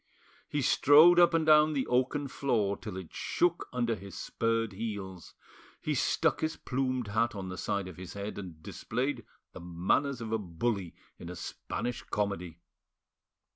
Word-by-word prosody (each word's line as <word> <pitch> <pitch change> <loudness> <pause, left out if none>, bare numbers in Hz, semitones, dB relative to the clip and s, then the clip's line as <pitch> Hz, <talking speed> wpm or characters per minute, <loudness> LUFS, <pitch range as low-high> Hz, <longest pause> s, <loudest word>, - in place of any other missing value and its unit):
He 145 -2 -1
strode 155 +7 +7
up 175 - +7
and 160 -1 +2
down 155 0 +6
the 135 -3 0
oaken 130 +3 +1
floor 115 -7 0
till 105 -3 -7
it 90 -4 -9
shook 175 -1 0
under 120 -2 0
his 100 -2 -8
spurred 115 -2 -1
heels; 95 -4 -6 0.4
he - - -2
stuck - - +1
his 160 0 -1
plumed 130 -3 -2
hat 110 +2 +1
on 95 -2 -5
the 90 - -5
side 100 -2 -2
of 90 - -10
his 90 -1 -8
head, 100 +1 -5
and 85 -5 -9
displayed 125 +1 -3 0.3
the - - -9
manners 90 +11 0
of 115 -2 -5
a 110 - +1
bully 95 0 -2 0.2
in 85 - -8
a 90 - -6
Spanish 120 +7 -4
comedy. 95 -5 -3
115 Hz, 165 wpm, -30 LUFS, 95-130 Hz, 0.4 s, strode